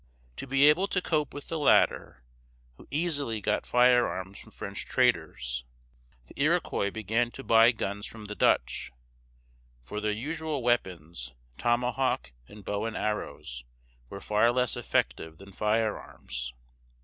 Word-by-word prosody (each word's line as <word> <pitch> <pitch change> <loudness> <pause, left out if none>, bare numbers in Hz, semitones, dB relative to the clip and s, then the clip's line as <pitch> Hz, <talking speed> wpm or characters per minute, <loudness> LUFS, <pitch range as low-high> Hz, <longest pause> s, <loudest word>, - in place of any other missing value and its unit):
To - - -6
be 135 +2 +5
able 175 +6 +5
to 195 - 0
cope 155 -5 0
with 145 - -8
the 165 - -2
latter, 140 - +3 0.5
who - - -16
easily 145 -7 0
got 105 +1 -1
firearms 120 -6 +3
from - - -13
French - - -6
traders, - - 0 0.6
the - - -8
Iroquois 100 - +1
began 110 +3 0
to 135 - -10
buy 115 0 +6
guns 105 -3 -4
from 110 -2 -10
the 105 - -5
Dutch; 65 -9 +1 0.9
for 85 +13 -6
their 105 0 0
usual 150 +4 -3
weapons, 85 - -1 0.2
tomahawk 125 - 0 0.2
and 105 -2 -13
bow 105 +1 -2
and 115 - -3
arrows, 65 - -4 0.5
were 100 - -7
far 105 +4 +3
less 125 -1 +1
effective 80 0 -1
than 100 0 -13
firearms. 105 - -2
110 Hz, 135 wpm, -28 LUFS, 100-125 Hz, 0.9 s, buy